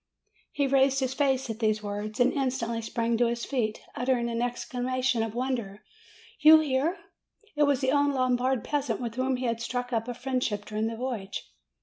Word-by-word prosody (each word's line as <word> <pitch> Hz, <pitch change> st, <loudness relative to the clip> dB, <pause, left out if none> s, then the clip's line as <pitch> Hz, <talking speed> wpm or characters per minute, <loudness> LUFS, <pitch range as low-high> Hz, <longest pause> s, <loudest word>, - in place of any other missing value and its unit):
He 285 Hz, -, 0 dB
raised 270 Hz, 0 st, +3 dB
his 260 Hz, -1 st, -1 dB
face 265 Hz, -2 st, +1 dB
at 220 Hz, -, -7 dB
these 215 Hz, -2 st, +1 dB
words, 210 Hz, +2 st, -4 dB
and 245 Hz, +1 st, +4 dB
instantly 250 Hz, -4 st, -1 dB
sprang 230 Hz, +1 st, -1 dB
to 240 Hz, -, +4 dB
his 235 Hz, 0 st, -2 dB
feet, 225 Hz, -6 st, -1 dB
uttering 245 Hz, -1 st, 0 dB
an 230 Hz, 0 st, -1 dB
exclamation 250 Hz, 0 st, -1 dB
of 225 Hz, 0 st, -3 dB
wonder; 235 Hz, -5 st, -3 dB, 0.6 s
"You 310 Hz, +1 st, +9 dB
here!" 300 Hz, +4 st, 0 dB, 0.6 s
It 295 Hz, 0 st, +4 dB
was 285 Hz, -2 st, +2 dB
the 260 Hz, -1 st, +2 dB
old 285 Hz, 0 st, +2 dB
Lombard 255 Hz, -1 st, +1 dB
peasant 280 Hz, -7 st, -1 dB
with 235 Hz, -3 st, -4 dB
whom 260 Hz, +2 st, 0 dB
he 250 Hz, 0 st, -3 dB
had 230 Hz, -1 st, -1 dB
struck 245 Hz, +1 st, -3 dB
up 225 Hz, 0 st, 0 dB
a 245 Hz, -, -4 dB
friendship 250 Hz, -5 st, -2 dB
during 215 Hz, +1 st, -2 dB
the 225 Hz, 0 st, -4 dB
voyage. 230 Hz, -6 st, -5 dB
250 Hz, 190 wpm, -28 LUFS, 230-265 Hz, 0.6 s, You